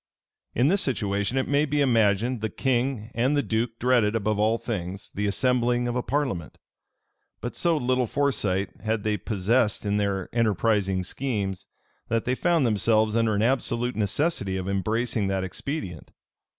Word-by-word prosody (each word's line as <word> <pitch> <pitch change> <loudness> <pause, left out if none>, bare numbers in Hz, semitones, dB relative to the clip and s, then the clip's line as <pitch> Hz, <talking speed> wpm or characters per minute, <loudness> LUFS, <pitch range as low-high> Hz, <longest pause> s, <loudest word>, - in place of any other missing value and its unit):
In 120 - +3
this 190 +7 +3
situation, 100 -2 -1
it 130 - 0
may 145 +1 +2
be 150 0 0
imagined 115 -2 +2
the 110 - -1
king 125 -1 -1
and 130 +5 +1
the 145 - +2
duke 115 +1 -1
dreaded, 120 -3 +2
above 110 -1 0
all 110 +2 +3
things, 100 -5 -5
the 105 +1 -1
assembling 120 +3 +1
of 120 - -2
a 125 - +1
parliament; 125 - -2 0.8
but 120 - -5
so 170 -2 +1
little 125 -2 +1
foresight 105 -9 0
had 110 -1 -1
they 105 -1 +1
possessed 105 +3 0
in 100 0 +1
their 100 -2 -1
enterprising 105 -4 +1
schemes, 100 -4 -3 0.4
that 115 -1 0
they 125 - +1
found 165 +1 +2
themselves 110 0 +2
under 115 -2 +2
an 105 - +1
absolute 120 -1 0
necessity 105 - 0
of 95 0 -4
embracing 110 +2 0
that 95 -1 -1
expedient. 95 - -5
115 Hz, 160 wpm, -26 LUFS, 100-125 Hz, 0.8 s, In